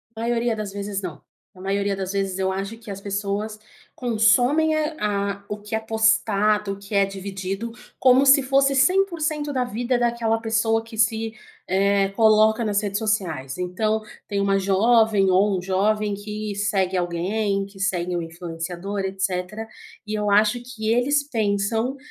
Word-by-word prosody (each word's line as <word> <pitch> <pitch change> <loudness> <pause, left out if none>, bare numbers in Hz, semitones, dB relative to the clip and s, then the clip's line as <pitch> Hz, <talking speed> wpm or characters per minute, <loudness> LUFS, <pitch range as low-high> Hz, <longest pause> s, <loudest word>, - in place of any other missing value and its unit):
Maioria 235 0 0
das 210 -2 -5
vezes 200 0 -4
não, 175 -6 -7 0.3
na 185 - -14
maioria 200 +1 -1
das 190 0 -4
vezes 195 -1 -1
eu 190 0 +1
acho 195 +4 -4
que 230 -2 -13
as 195 - -6
pessoas 205 +2 -3 0.4
consomem, 245 +7 +3
eh, 310 0 -1
a 200 -1 -1
o 210 - -3
que 210 +1 -5
é 220 - 0
postado, 220 -2 +2
o 195 - -10
que 200 +1 -7
é 200 0 +5
dividido 195 +3 -5 0.3
como 260 +1 +5
se 275 +1 +7
fosse 275 +1 +2
100% 315 -2 +1
da 255 -1 +1
vida 245 +2 -1
daquela 235 -2 +1
pessoa 225 0 +1
que 225 -1 -11
se, 220 0 +1 0.3
eh, 195 +1 +2
coloca 220 +1 +4
nas 205 -1 +1
redes 200 -1 -2
sociais. 180 - -2
Então, 215 +5 -1 0.2
tem 200 -1 -2
uma 195 0 +2
jovem 200 +1 +3
ou 190 +1 +3
um - - -3
jovem 205 +3 0
que 210 0 -5
segue 195 -2 0
alguém, 195 +3 -1
que 200 0 -15
segue 180 -2 -1
um 170 - -1
influenciador, 175 +4 -5
etc. 190 +2 -3 0.4
E 215 - -4
eu 210 -1 0
acho 215 +4 +3
que 225 -3 -5
eles 285 +4 +2
pensam 220 +2 0
210 Hz, 165 wpm, -23 LUFS, 195-225 Hz, 0.4 s, se